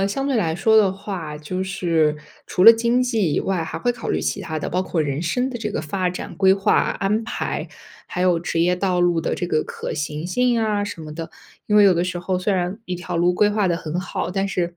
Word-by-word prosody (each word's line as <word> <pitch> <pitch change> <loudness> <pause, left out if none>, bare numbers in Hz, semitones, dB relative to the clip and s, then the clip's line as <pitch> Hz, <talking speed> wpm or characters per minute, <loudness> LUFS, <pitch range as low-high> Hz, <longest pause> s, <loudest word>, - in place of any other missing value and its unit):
呃， 195 - +2
相 270 +7 -2
对 270 - +1
来 165 -7 0
说 220 +6 +3
的 200 -3 +5
话， 190 -6 -6
就 185 +5 -4
是 165 -5 +1 0.3
除 180 - 0
了 230 - +11
经 235 +2 +1
济 220 -10 0
以 - - +1
外， 185 -4 -1
还 - - -5
会 245 - +1
考 245 - -5
虑 - - 0
其 - - -2
他 160 -2 -4
的， - - -4
包 180 +1 0
括 170 -4 -1
人 140 0 -2
生 250 +10 0
的 240 - -5
这 215 -1 -3
个 - - -2
发 180 +4 -2
展 180 - -7
规 190 -1 +5
划 195 0 +1
安 210 +3 0
排， - - -3 0.4
还 180 - -5
有 180 -2 +3
职 165 -1 -2
业 180 +2 +2
道 180 -1 0
路 175 -1 +2
的 - - -1
这 175 - -3
个 155 -3 0
可 - - -6
行 150 +1 -4
性 240 +5 +1
啊 210 -2 0
什 205 -5 -7
么 155 -1 -8
的。 165 +1 -6 0.4
因 210 - 0
为 210 - +7
有 190 - +6
的 170 +1 +1
时 180 -1 -3
候 180 +1 -1
虽 195 +2 0
然 180 +2 -2
一 180 - -4
条 175 0 -5
路 175 +1 +3
规 205 +3 +3
划 205 -1 +1
得 175 -2 +1
很 165 0 -4
好， 180 -1 -3
但 195 +1 -1
是 175 -3 -2
185 Hz, 280 characters per minute, -22 LUFS, 170-205 Hz, 0.4 s, 了